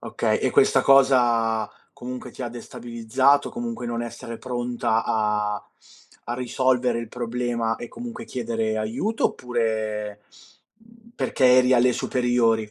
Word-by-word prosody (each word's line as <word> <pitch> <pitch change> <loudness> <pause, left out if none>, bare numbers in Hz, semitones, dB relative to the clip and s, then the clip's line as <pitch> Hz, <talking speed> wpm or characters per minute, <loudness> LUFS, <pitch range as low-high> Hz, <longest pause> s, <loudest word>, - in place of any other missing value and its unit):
Okay, - - -1
e - - 0
questa - - +4
cosa, 120 -5 +4 0.2
comunque 125 +1 -7
ti - - -8
ha 120 - -3
destabilizzato, 120 +3 0
comunque 235 - -5
non 120 0 -2
essere 115 0 -7
pronta 120 -2 -1
a 105 -1 0 0.7
a - - -1
risolvere 125 -1 +1
il 115 -1 -6
problema 120 -1 -2
e 120 - -8
comunque 235 -2 -8
chiedere 115 -3 -2
aiuto, 115 - -2
oppure, 110 -3 -3 0.5
mhmm, 230 +1 -22
perché 130 - +1
eri 130 0 +5
alle 125 0 +4
superiori? 115 -4 +1
120 Hz, 130 wpm, -24 LUFS, 115-130 Hz, 0.7 s, eri